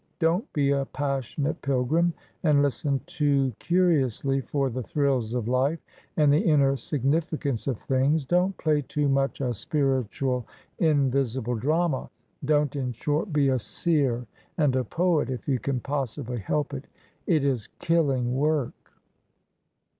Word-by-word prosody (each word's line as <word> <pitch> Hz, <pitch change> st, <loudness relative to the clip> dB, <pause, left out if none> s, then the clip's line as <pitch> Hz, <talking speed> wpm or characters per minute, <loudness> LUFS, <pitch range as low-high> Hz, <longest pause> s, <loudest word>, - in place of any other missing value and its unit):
Don't 175 Hz, -, 0 dB
be 140 Hz, -2 st, +1 dB
a 140 Hz, -1 st, +1 dB
Passionate 140 Hz, +3 st, -2 dB
Pilgrim 140 Hz, +6 st, +1 dB, 0.3 s
and 150 Hz, -3 st, +4 dB
listen 140 Hz, 0 st, 0 dB
too 145 Hz, -6 st, +1 dB
curiously 140 Hz, -7 st, +1 dB
for 135 Hz, 0 st, -1 dB
the 130 Hz, +2 st, -3 dB
thrills 135 Hz, -5 st, 0 dB
of 120 Hz, -3 st, -2 dB
life 130 Hz, +6 st, +1 dB, 0.4 s
and 150 Hz, -2 st, +5 dB
the 150 Hz, -, +4 dB
inner 140 Hz, -4 st, +3 dB
significance 145 Hz, -1 st, -1 dB
of 130 Hz, -5 st, 0 dB
things. 135 Hz, +3 st, +1 dB
Don't 180 Hz, +5 st, +1 dB
play 150 Hz, -2 st, +1 dB
too 145 Hz, +1 st, -1 dB
much 135 Hz, 0 st, 0 dB
a 125 Hz, -2 st, 0 dB
spiritual, 130 Hz, -1 st, -1 dB, 0.3 s
invisible 135 Hz, -6 st, +1 dB
drama. 150 Hz, +4 st, 0 dB, 0.3 s
Don't, 150 Hz, 0 st, +1 dB
in 130 Hz, -3 st, -2 dB
short, 150 Hz, -, -1 dB
be 145 Hz, -2 st, +3 dB
a 130 Hz, -1 st, +1 dB
seer 125 Hz, 0 st, 0 dB, 0.3 s
and 145 Hz, -5 st, +2 dB
a 130 Hz, -, +1 dB
poet 165 Hz, +2 st, +1 dB
if 125 Hz, -2 st, -5 dB
you 135 Hz, -3 st, +1 dB
can 135 Hz, 0 st, -2 dB
possibly 130 Hz, -2 st, -3 dB
help 145 Hz, +8 st, -2 dB
it. 135 Hz, 0 st, -6 dB, 0.4 s
It 155 Hz, -5 st, +2 dB
is 125 Hz, -7 st, -1 dB
killing 140 Hz, -7 st, +1 dB
work 145 Hz, -1 st, +1 dB
140 Hz, 140 wpm, -26 LUFS, 130-150 Hz, 0.4 s, and